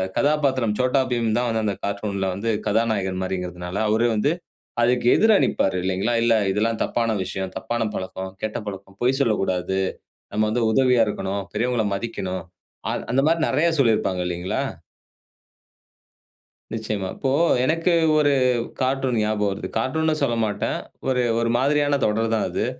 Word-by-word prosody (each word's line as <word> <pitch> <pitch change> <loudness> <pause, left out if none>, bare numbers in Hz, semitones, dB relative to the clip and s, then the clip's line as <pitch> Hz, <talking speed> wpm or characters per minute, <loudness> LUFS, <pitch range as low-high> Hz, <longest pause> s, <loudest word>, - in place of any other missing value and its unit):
கதாபாத்திரம் 135 -6 +2
Chhota 130 +2 +2
Bheem 120 -2 0
தான் 125 0 +1
வந்து 115 -1 0
அந்த 100 -2 0
கார்ட்டூன்‌ல 100 -1 -2
வந்து 100 +5 -3 0.2
கதாநாயகன் 105 -4 0
மாரிங்கறதனால, 90 -1 -4
அவரு 110 +2 +2
வந்து 110 +8 +2 0.5
அதுக்கு 125 +1 +2
எதிரா 220 0 +5
நிப்பாரு, 95 - +1
இல்லைங்களா? 95 +5 0
"இல்லை 115 -1 +4
இதெல்லாம் 110 +3 0
தப்பான 115 -1 0
விஷயம், 95 0 -5
தப்பான 120 -1 -2
பழக்கம், 95 0 -5
கெட்ட 110 0 -2
பழக்கம். 100 0 -8
பொய் 130 +2 +2
சொல்லக்கூடாது. 95 -6 0 0.5
நம்ம 110 - +2
வந்து 120 +1 +1
உதவியா 125 -1 +4
இருக்கணும். 100 -1 -3
பெரியவங்கள 120 +1 0
மதிக்கணும்." 95 -4 -4 0.5
அ - - -1 0.2
அந்த 135 +2 +3
மாரி 165 +1 +2
நெறைய 170 +3 +2
சொல்லியிருப்பாங்க, 110 -7 +2
இல்லைங்களா? 90 +1 -2 2.1
நிச்சயமா. 105 -3 -3
இப்போ 135 - -1 0.3
எனக்கு 165 +4 +2 0.2
ஒரு 145 -1 +4 0.5
கார்ட்டூன் 130 -1 +1
ஞாபகம் 105 -1 +1
வருது. 100 - -4
கார்ட்டூன்னு 155 +7 +1
சொல்ல 120 -4 +1
மாட்டேன், 105 -1 -2 0.3
ஒரு 130 -1 +2 0.2
ஒரு 115 0 +1
மாதிரியான 145 +2 +2
தொடர் 110 +1 +1
தான் 110 - 0
அது. - - -1
115 Hz, 140 wpm, -23 LUFS, 100-130 Hz, 2.1 s, எதிரா